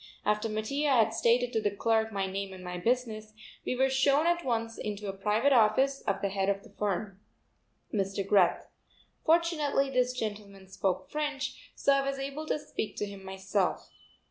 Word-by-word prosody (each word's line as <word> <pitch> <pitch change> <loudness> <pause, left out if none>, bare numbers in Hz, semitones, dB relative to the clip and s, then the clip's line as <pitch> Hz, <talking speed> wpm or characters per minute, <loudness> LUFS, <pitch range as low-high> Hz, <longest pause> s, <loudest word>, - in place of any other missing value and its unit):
After 210 +2 +1
Mattia 245 +8 -1
had 235 -5 +4
stated 245 +1 +2
to 220 - +1
the 210 - +2
clerk 220 +2 +1
my 195 -2 -1
name 195 0 -4
and 185 -1 -10
my 180 0 -5
business, 220 -1 -1 0.3
we - - 0
were 265 +1 +3
shown 275 +3 +3
at 345 0 +2
once 230 -2 -2
into 210 0 -4
the 195 - -3
private 215 +8 +2
office 260 +4 +3
of 200 - 0
the 200 - +1
head 195 0 0
of 200 0 -1
the 230 - -16
firm, 200 -1 -3 0.7
Mr. 195 -1 -1
Greth. 195 -3 +3 0.6
Fortunately 315 -4 +2
this 250 -1 +2
gentleman 205 -4 -6
spoke 190 -1 -2
French, 295 -2 -3
so 280 - +3
I 275 - +3
was 275 - -3
able 275 +3 -5
to - - +1
speak 295 -7 -5
to - - -2
him 200 -1 -9
myself. 190 0 -2
220 Hz, 180 wpm, -30 LUFS, 200-270 Hz, 0.7 s, had